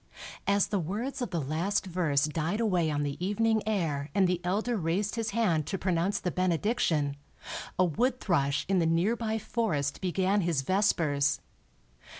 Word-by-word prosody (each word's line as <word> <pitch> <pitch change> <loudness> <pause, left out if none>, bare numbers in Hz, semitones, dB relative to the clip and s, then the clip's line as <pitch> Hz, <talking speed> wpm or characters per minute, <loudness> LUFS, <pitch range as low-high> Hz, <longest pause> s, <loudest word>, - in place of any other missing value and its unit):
As 200 0 +4
the 205 - 0
words 225 - -3
of 245 - -2
the 170 - -2
last 165 +9 -1
verse 165 -6 +1
died 160 +6 -2
away 180 -8 +2
on 145 -1 0
the 145 +4 -4
evening 220 +3 +2
air 160 -9 -1
and 195 -2 +4
the 180 -1 0
elder 210 +7 0
raised 190 +3 -1
his 225 -2 -2
hand 180 -9 +1
to 195 - -2
pronounce 185 +1 0
the 180 - -2
benediction, 175 -5 +1 0.6
a 185 - +4
wood 245 - 0
thrush 145 -5 +1
in 190 0 +2
the 165 - +2
nearby 220 +7 +1
forest 200 -11 -1
began 190 +2 +1
his 165 -6 0
vespers. 150 -6 +2
185 Hz, 160 wpm, -29 LUFS, 160-210 Hz, 0.6 s, As